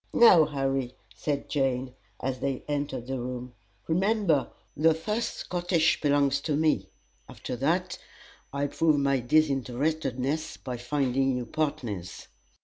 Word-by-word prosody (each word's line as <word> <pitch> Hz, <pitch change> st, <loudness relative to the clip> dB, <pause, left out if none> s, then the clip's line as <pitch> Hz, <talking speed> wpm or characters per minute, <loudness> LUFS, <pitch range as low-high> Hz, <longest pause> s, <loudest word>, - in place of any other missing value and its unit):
"Now, 180 Hz, -9 st, +8 dB
Harry," 135 Hz, -3 st, -2 dB, 0.2 s
said 145 Hz, -2 st, -3 dB
Jane, 130 Hz, -3 st, -1 dB, 0.3 s
as 130 Hz, -1 st, -2 dB
they 135 Hz, -2 st, -2 dB
entered 140 Hz, -4 st, -2 dB
the 130 Hz, 0 st, -3 dB
room, 125 Hz, 0 st, -5 dB, 0.3 s
"remember, 185 Hz, -4 st, +2 dB, 0.3 s
the 160 Hz, +2 st, +4 dB
first 210 Hz, +8 st, -2 dB
schottisch 175 Hz, -2 st, +1 dB
belongs 140 Hz, -1 st, +2 dB
to 150 Hz, -1 st, -1 dB
me. 150 Hz, -11 st, +1 dB, 0.4 s
After -, -, -6 dB
that, -, -, 0 dB, 0.5 s
I'll 140 Hz, +1 st, -1 dB
prove 155 Hz, 0 st, +2 dB
my 140 Hz, -1 st, +2 dB
disinterestedness 140 Hz, +1 st, 0 dB
by 125 Hz, -2 st, -5 dB
finding 135 Hz, 0 st, 0 dB
you 125 Hz, -, -3 dB
partners." 125 Hz, -, -3 dB
140 Hz, 125 wpm, -28 LUFS, 130-155 Hz, 0.5 s, Now